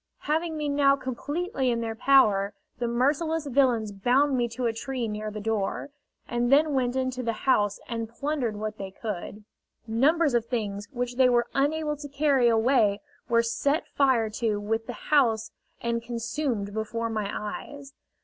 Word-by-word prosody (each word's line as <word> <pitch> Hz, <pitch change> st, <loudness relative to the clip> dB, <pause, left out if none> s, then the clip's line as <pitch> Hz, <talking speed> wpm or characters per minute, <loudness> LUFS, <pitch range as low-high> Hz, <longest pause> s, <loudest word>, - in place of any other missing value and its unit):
Having 320 Hz, +1 st, -1 dB
me 300 Hz, -1 st, -2 dB
now 280 Hz, -1 st, +4 dB
completely 275 Hz, +2 st, -2 dB
in 235 Hz, -1 st, 0 dB
their 225 Hz, -1 st, -2 dB
power, 210 Hz, -5 st, +4 dB, 0.2 s
the 240 Hz, -, 0 dB
merciless 295 Hz, +7 st, +1 dB
villains 250 Hz, -6 st, +2 dB
bound 255 Hz, +8 st, +2 dB
me 240 Hz, -1 st, +1 dB
to 240 Hz, +2 st, -4 dB
a 230 Hz, -, +1 dB
tree 250 Hz, +1 st, -3 dB
near 215 Hz, 0 st, -4 dB
the 215 Hz, 0 st, -6 dB
door, 220 Hz, +5 st, -2 dB, 0.4 s
and 240 Hz, +1 st, 0 dB
then 295 Hz, +2 st, +5 dB
went 255 Hz, -2 st, 0 dB
into 255 Hz, -1 st, -1 dB
the 230 Hz, -2 st, -1 dB
house 205 Hz, -6 st, +2 dB
and 230 Hz, -2 st, -4 dB
plundered 260 Hz, -2 st, -2 dB
what 215 Hz, +1 st, -5 dB
they 195 Hz, -1 st, -5 dB
could. 210 Hz, +1 st, -6 dB, 0.4 s
Numbers 285 Hz, +7 st, +2 dB
of 235 Hz, -1 st, +1 dB
things 205 Hz, -4 st, -3 dB
which 245 Hz, -1 st, -3 dB
they 260 Hz, -1 st, +6 dB
were 240 Hz, -1 st, +3 dB
unable 300 Hz, +2 st, +1 dB
to 290 Hz, 0 st, -7 dB
carry 280 Hz, -3 st, +3 dB
away 225 Hz, -3 st, +3 dB, 0.3 s
were 230 Hz, 0 st, +4 dB
set 280 Hz, +7 st, 0 dB
fire 250 Hz, -6 st, +2 dB
to 215 Hz, -1 st, -1 dB
with 225 Hz, +2 st, -2 dB
the 245 Hz, +3 st, -8 dB
house 230 Hz, -7 st, +3 dB, 0.3 s
and 235 Hz, 0 st, -1 dB
consumed 235 Hz, -2 st, -3 dB
before 225 Hz, +1 st, -3 dB
my 215 Hz, -2 st, -2 dB
eyes. 275 Hz, +7 st, -6 dB
240 Hz, 170 wpm, -27 LUFS, 220-275 Hz, 0.4 s, they